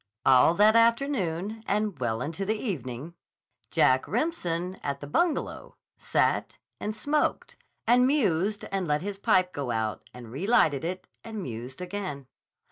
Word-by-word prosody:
All 135 +5 +6
that 215 +3 +5
afternoon 225 - +1
and 205 -5 0
well 115 -1 -1
into 165 +6 -4
the 215 +3 0
evening, 150 - -5 0.6
Jack 130 0 +3
Remsen, 185 - -1
at 140 -1 -3
the 145 - -7
Bungalow, 310 - -1 0.2
sat - - 0 0.2
and 210 +1 -3
smoked 305 - -1 0.3
and 250 +2 +5
mused 210 - +1
and 195 -3 -1
let 150 +2 0
his 200 0 -5
pipe 185 -2 +2
go 140 -3 -4
out 110 -2 -1
and 120 -2 -11
relighted 155 - +2
it 180 +2 -4 0.2
and 220 -3 -6
mused 125 +4 -7
again. 180 -7 -5
185 Hz, 140 wpm, -27 LUFS, 140-220 Hz, 0.6 s, All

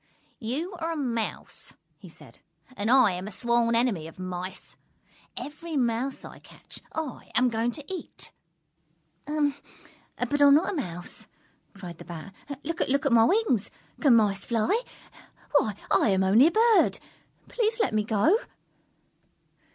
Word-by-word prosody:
"You 290 - -3
are 330 0 -2
a - - -5
Mouse," 235 -6 -4 0.3
he - - -12
said, - - -14 0.4
"and 205 0 -2
I 255 -5 +6
am 180 +2 -5
a - - -6
sworn 235 +2 +1
enemy 225 -10 +1
of 165 - -13
Mice. 185 0 -6 0.6
Every 310 +2 -5
Mouse 245 +2 -1
I - - -11
catch, - - -11 0.2
I 315 -5 -5
am 250 0 +4
going 230 +1 0
to 295 - -9
eat!" 375 -1 -8 1.0
"But 300 - -4 0.8
I 285 +4 +3
am 280 - +8
not 320 +5 +2
a - - -4
Mouse!" 175 - -5 0.5
cried 180 -4 -9
the - - -10
Bat. 170 +3 -9 0.3
"Look 335 +2 -3 0.2
at 280 - +2
my 225 -1 +6
wings. 370 - +2 0.3
Can 275 -6 +5
Mice 200 -3 +2
fly? 235 - +1 0.8
Why, 215 -6 -2 0.2
I - - +4
am 190 -1 +2
only 215 +10 +6
a - - +2
Bird! 450 +3 +4 0.5
Please 450 -1 -1
let 435 - +1
me 215 -1 +2
go!" 220 - +3
235 Hz, 150 wpm, -27 LUFS, 205-300 Hz, 1.0 s, am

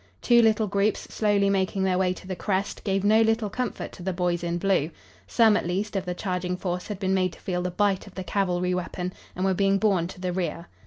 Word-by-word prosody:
Two 240 -1 +5
little 220 -1 +3
groups 200 +1 +1
slowly 205 -2 +2
making 195 0 +1
their 185 -1 +1
way 185 -1 +2
to 185 - -8
the 185 0 -4
crest 195 +2 -2
gave 195 -1 0
no 215 +2 +5
little 225 -2 +1
comfort 250 +3 -3
to - - -12
the 190 +2 -2
boys 175 -1 -1
in 170 0 -1
blue. 185 -4 +1 0.4
Some, 225 -3 +4
at 190 - -1
least, 200 +4 -2
of 195 -1 -1
the 180 0 -3
charging 180 -1 -2
force 180 -1 -3
had 210 - -4
been 190 -1 0
made 185 -2 +1
to - - -15
feel 180 -1 -2
the 180 - -1
bite 200 +2 0
of 195 - -14
the 190 - -4
cavalry 180 -1 0
weapon, 180 0 -3 0.2
and 185 - -1
were 190 - +3
being 195 +1 +2
borne 195 -5 +2
to 185 - -11
the 180 -1 -2
rear. 170 -2 -3
190 Hz, 245 wpm, -26 LUFS, 180-205 Hz, 0.4 s, Two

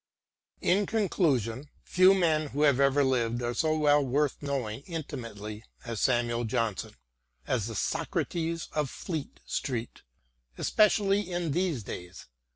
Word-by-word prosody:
In 200 +3 +2
conclusion, 145 - 0
few 185 +1 +5
men 160 -4 +2
who 145 +1 -1
have 140 -3 +4
ever 140 +1 +4
lived 120 -2 0
are 120 0 -1
so 155 +3 +1
well 145 -1 +4
worth 140 +2 0
knowing 135 -5 -3
intimately 115 - -6 0.2
as 115 -3 -4
Samuel 120 -1 +1
Johnson 115 -3 -2 0.3
— 60 0 -44
as 110 -4 -2
the 115 - -6
Socrates 165 - -2
of 150 -3 -1
Fleet 160 -1 -6
Street, 125 -4 -3 0.6
especially 205 -2 +2
in 175 -3 -1
these 170 - 0
days. 90 -2 -8
140 Hz, 135 wpm, -29 LUFS, 115-165 Hz, 0.6 s, few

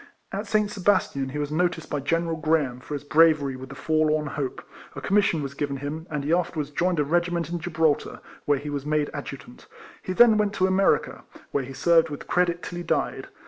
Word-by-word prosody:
At 205 +2 -4
St. 210 0 +1
Sebastian 180 -9 +1
he 140 - -5
was 145 0 -2
noticed 170 0 -1
by 145 - 0
General 165 +4 0
Graham, 155 -6 0
for 145 +3 -6
his 140 - -6
bra 160 +3 +6
very 140 -3 -4
with 130 0 -9
the 140 - -9
forlorn 155 -1 +1
hope, 135 -2 -4 0.3
a - - -5
commission 195 -6 +2
was 140 0 -5
given 140 -1 -3
him, 150 +4 -5
and 150 -2 -3
he 150 +4 +1
afterwards 160 -4 -1
joined 175 +2 0
a - - +4
regiment 170 +2 0
in 175 - -2
Gibraltar, 160 -3 0 0.3
where 145 -1 +3
he 145 +2 -6
was 140 -2 -3
made 150 0 0
Adjutant. - - -8 0.3
He 185 - -4
then 225 +1 +6
went 210 -1 +1
to 185 - +2
America, 190 +1 +2 0.3
where 140 - 0
he 135 +1 -8
served 165 +3 +3
with 145 - -7
credit 175 0 +1
till 175 - -6
he 175 - -4
died. - - -1
155 Hz, 215 wpm, -25 LUFS, 145-175 Hz, 0.3 s, bra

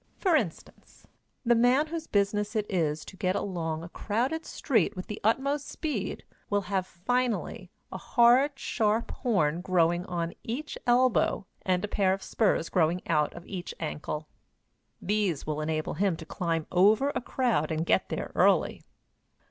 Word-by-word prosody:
For 365 -5 +2
instance, 210 - -4 0.4
the 240 - +5
man 245 +5 +4
whose 320 0 -5
business 205 +1 0
it 215 -1 +1
is 155 -4 0
to - - -11
get 185 0 0
along 165 -4 -3
a 170 - -8
crowded 250 - -2
street 220 - +1
with 185 - -5
the 210 - -7
utmost 275 +6 +1
speed 280 - -3 0.3
will 205 0 +2
have, 190 -1 -2
finally, 245 +6 -2 0.2
a - - -5
hard, 250 +4 +4
sharp 220 -3 0
horn 175 - 0
growing 175 -1 +1
on 170 -1 -2
each 275 +7 -4
elbow, 245 -4 +3 0.2
and 185 +1 0
a - - -5
pair 195 -2 +2
of 195 - -5
spurs 205 -6 +1
growing 175 0 +1
out 150 -3 +2
of 170 - -10
each 180 -3 -6
ankle. 150 -1 -4 0.7
These 200 -7 0
will 155 0 -2
enable 155 0 -2
him 195 -3 +1
to 160 - -9
climb 165 -2 -2
over 210 +10 +4
a - - -2
crowd 240 - 0
and 160 +1 -1
get - - +2
there - - -4
early. - - +3
200 Hz, 160 wpm, -28 LUFS, 170-240 Hz, 0.7 s, the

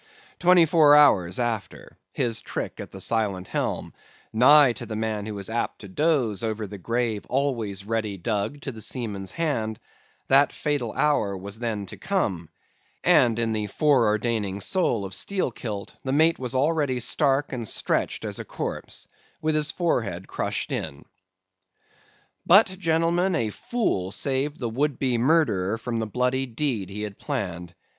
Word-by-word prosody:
Twenty 180 -1 +6
four 155 -2 +6
hours 95 -12 +5
after, 115 -4 -3 0.2
his 115 -2 -1
trick - - -5
at - - -7
the 95 - -10
silent 100 -3 0
helm—nigh 130 +3 +2
to - - -8
the 110 - -5
man 110 -1 -2
who 105 - -5
was 100 -1 -4
apt 115 +1 -3
to 100 - -9
doze 120 - +1
over 110 -1 -2
the 100 0 -9
grave 115 +1 -1
always 115 -8 -1
ready 110 -2 -2
dug 105 +8 -2
to 135 - -4
the 110 -3 -8
seaman's 105 -5 -2
hand—that 135 - 0
fatal 145 -7 -2
hour 135 -9 +1
was 100 +3 -6
then 110 -4 -2
to - - -9
come; 100 - -1 0.5
and 135 -10 +4
in 115 -1 0
the 105 -1 -2
fore 135 0 +3
ordaining 105 -2 -1
soul 115 - 0
of 95 - -6
Steelkilt, 115 - -3
the 130 - -2
mate 160 +4 +3
was 130 0 -3
already 145 -2 +1
stark 135 +3 +1
and 120 -3 -3
stretched - - -1
as - - -3
a - - -4
corpse, - - -5 0.3
with 155 0 0
his 150 0 +1
forehead 110 - -1
crushed - - -3
in. 70 0 -4 1.4
"But, 200 +6 +7
gentlemen, 170 +2 +1
a 115 -5 0
fool 100 - -2
saved 140 +5 0
the 120 - -2
would 140 +3 -1
be 125 -3 0
murderer 115 - +2
from 115 0 -3
the 110 - -2
bloody 125 +4 0
deed 115 -6 -2
he 105 +2 -5
had 105 -2 -7
planned. 90 - -4
115 Hz, 155 wpm, -25 LUFS, 105-145 Hz, 1.4 s, But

